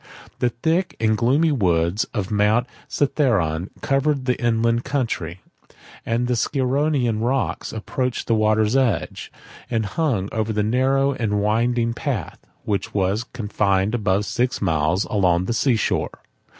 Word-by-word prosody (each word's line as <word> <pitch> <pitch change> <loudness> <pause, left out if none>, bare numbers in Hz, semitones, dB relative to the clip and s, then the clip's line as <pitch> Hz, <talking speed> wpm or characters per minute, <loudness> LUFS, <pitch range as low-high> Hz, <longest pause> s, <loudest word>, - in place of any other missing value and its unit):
The 125 - +2
thick 160 +7 -1
and 110 -1 +2
gloomy 135 +9 +2
woods 90 - +1
of 100 0 -4
Mount 105 +3 +3 0.2
Cithaeron 105 - +1
covered 140 -1 +1
the 125 -1 +2
inland 115 0 +2
country; 95 - -3 0.6
the 120 +2 0
Scironian 130 -2 0
rocks 130 +1 -1
approached 125 +3 -3
the 115 - +1
water's 110 +1 +2
edge, 130 -5 0 0.4
and 115 -2 0
hung 110 - -1
over 110 0 -1
the 105 -1 0
narrow 135 +5 +2
and 105 -5 -1
winding 115 +3 +1
path, 120 - -4 0.2
which 100 -1 -2
was 100 +4 0
confined 105 -3 0
above 105 -3 +1
six 125 +3 -1
miles 80 +4 +1
along 90 -4 +1
the 115 - -1
sea 115 +2 +2
shore. 110 - -2
115 Hz, 135 wpm, -22 LUFS, 105-130 Hz, 0.6 s, Mount